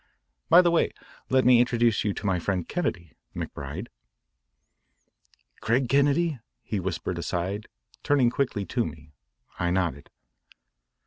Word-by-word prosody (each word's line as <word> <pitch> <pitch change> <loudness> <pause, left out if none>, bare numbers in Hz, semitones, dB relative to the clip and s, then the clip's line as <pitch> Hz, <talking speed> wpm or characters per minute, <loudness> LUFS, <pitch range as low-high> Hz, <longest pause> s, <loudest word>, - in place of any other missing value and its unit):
"By 175 +2 +8
the 175 - +3
way, 170 - +2 0.4
let 130 -1 +3
me 125 -1 +7
introduce 120 -2 +2
you 105 - +1
to - - -6
my 95 -3 +1
friend 90 0 -2
Kennedy, 85 - -3 0.2
McBride." 75 - -6 1.7
"Craig 125 +3 +1
Kennedy?" 140 +3 +2 0.2
he 105 - -3
whispered 90 -1 -3
aside, 90 +5 -3 0.3
turning 135 -5 +3
quickly 120 -7 -1
to 120 +3 0
me. 75 -2 -9 0.5
I 90 - +1
nodded. 85 -6 -1
105 Hz, 125 wpm, -26 LUFS, 85-130 Hz, 1.7 s, By